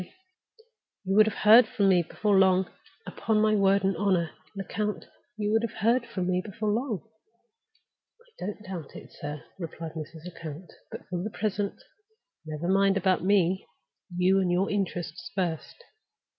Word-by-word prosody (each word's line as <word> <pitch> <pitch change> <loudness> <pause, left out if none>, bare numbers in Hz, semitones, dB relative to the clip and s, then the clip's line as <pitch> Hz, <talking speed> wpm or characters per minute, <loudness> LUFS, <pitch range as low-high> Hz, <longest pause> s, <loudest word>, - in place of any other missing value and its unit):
"You 195 +1 0
would 215 +1 +7
have 220 - -3
heard 220 +2 +9
from 200 -2 +2
me 180 -2 +5
before 205 +5 0
long. 190 -1 +4 0.4
Upon 220 -1 0
my 215 0 +3
word 200 -1 +3
and 195 0 +1
honor, 185 -5 +1 0.2
Lecount, 205 +2 -3 0.3
you 210 -1 -1
would 225 +1 +3
have 230 -1 -4
heard 235 +3 +2
from 185 -2 -3
me 180 0 +1
before 210 0 -2
long!" 225 -2 -2 1.1
"I 475 - -14
don't 210 +1 -6
doubt 175 -6 -7
it, - - -11
sir," 150 0 -6 0.2
replied 165 -2 -6
Mrs. 160 0 -8
Lecount. 165 -1 -9 0.2
"But - - -9
for 180 -1 -3
the 210 - -3
present, 205 0 -3 0.6
never 155 +2 -4
mind 195 +1 +3
about 185 -2 +1
Me. 190 -1 +2 0.5
You 185 +2 +4
and 185 -2 +1
your 185 +3 +1
interests 180 -3 -3
first." 180 - -3
195 Hz, 155 wpm, -27 LUFS, 175-210 Hz, 1.1 s, heard